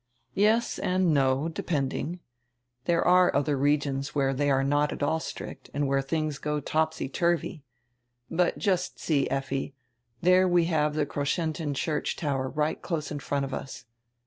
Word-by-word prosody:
"Yes 220 +4 +2
and 180 -2 +2
no, 135 +1 +2
depending. 160 +1 -2 0.6
There 170 -1 +2
are 180 0 +6
other 145 +1 +2
regions 140 0 0
where 135 -1 +2
they 145 +2 +1
are 135 -1 +3
not 145 +2 +2
at - - -4
all 160 +2 +1
strict - - -8
and 145 0 +1
where 135 0 +2
tilings 155 +1 -2
go 150 0 -1
topsy 160 +2 -1
turvy 170 +1 0 0.4
— 120 - -50 0.3
But 175 +1 +1
just 185 -4 0
see, 145 -4 +1
Effi, 135 0 -2 0.4
there 185 +3 +5
we 175 -2 +3
have 150 -3 +1
the 155 -1 +1
Kroschentin 150 +1 -2
church 150 +1 -1
tower 135 -4 -1
right 150 +4 -1
close 155 -4 -3
in 145 - -3
front 140 0 -1
of 135 - -7
us. 135 -1 -6
150 Hz, 165 wpm, -27 LUFS, 140-170 Hz, 0.6 s, are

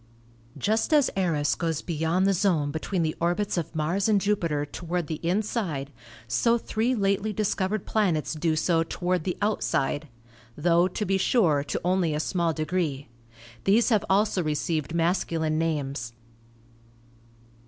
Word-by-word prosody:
Just 215 - 0
as 290 -3 +4
Eros 165 -6 +1
goes 165 -3 -2
beyond 165 +3 0
the 195 - +3
zone 170 -7 +1
between 165 +3 -2
the 155 -1 -1
orbits 175 +5 0
of 170 -2 -3
Mars 175 +7 0
and 210 -2 +4
Jupiter 170 -8 0
toward 170 +3 -3
the 155 0 -4
inside, 175 - -1 0.4
so 230 - +2
three 230 +2 -1
lately 200 0 0
dis 210 0 0
covered 190 +1 -2
planets 180 -10 0
do 160 0 0
so 165 +1 +2
toward 175 +1 -1
the 180 - -2
outside; 150 -8 0 0.5
tho, 170 +3 +3
to 200 +3 -3
be 195 0 +1
sure, 170 - +3
to - - -2
only 180 -4 +1
a - - -1
small 170 +1 0
degree. 155 -4 -2 0.6
These 220 +5 +4
have 215 -4 +3
also 200 -1 +2
received 155 0 -2
mas 170 +3 +2
culine 160 -2 -1
names. 140 -7 -2
175 Hz, 150 wpm, -26 LUFS, 155-195 Hz, 0.6 s, as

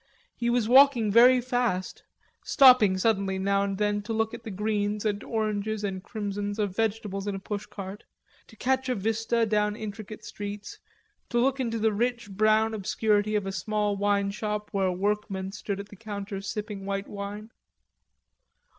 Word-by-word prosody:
He 235 0 -1
was 240 -2 +1
walking 255 -4 +6
very 250 +4 +7
fast, 245 -7 -1 0.4
stopping 250 -8 +6
suddenly 195 -2 +1
now 195 +1 +1
and 200 -1 -1
then 205 0 0
to 210 +2 -4
look 220 0 0
at - - -7
the 225 - -6
greens 210 +1 -1
and 205 -1 -1
oranges 215 -1 -2
and 190 -2 -3
crimsons 205 -1 -4
of 205 -3 -1
vegetables 210 -3 -2
in 200 - -1
a - - -4
push 205 +1 -5
cart, 195 0 -8 0.4
to - - -16
catch 260 +3 0
a 250 - +1
vista 225 +2 0
down 210 -1 +1
intricate 215 -1 -7
streets, 205 0 -7 0.5
to 240 - -1
look 265 +3 +2
into 230 -3 -1
the 220 -1 +1
rich 235 0 -1
brown 215 +2 +3
obscurity 215 +1 +1
of 205 -2 0
a 195 - -3
small 205 +2 -1
wine 200 0 +1
shop 210 0 -3
where 195 -2 +1
workmen 195 0 -2
stood 200 -1 -4
at 200 +1 -8
the - - -12
counter 200 -1 -6
sipping 205 0 -5
white 195 0 -3
wine. 205 +2 -7
210 Hz, 170 wpm, -27 LUFS, 200-225 Hz, 0.5 s, very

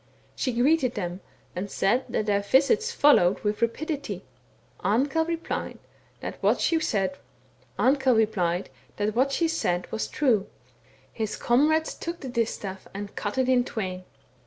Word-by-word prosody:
She 255 - -1
greeted 255 +1 +2
them 175 +1 -4 0.3
and 190 +3 -3
said 240 +8 +1
that 215 - -1
their 200 -1 +2
visits 295 - +3
followed 245 - +4
with 210 +1 -1
rapidity. 285 +5 -2 0.6
Amkell 275 +9 +2
replied 335 0 -3 0.4
that - - -6
what - - +3
she 330 -1 +2
said 205 -5 0 2.8
was 110 0 -2
true. 220 - +1 0.7
His 220 -2 -3
comrades 305 +6 +2
took 340 +1 -6
the 265 - -5
distaff 215 -5 -3
and 200 0 -6
cut 205 +3 -3
it 260 -1 +2
in 255 -1 +4
twain. 185 -6 -4
240 Hz, 120 wpm, -26 LUFS, 200-290 Hz, 2.8 s, followed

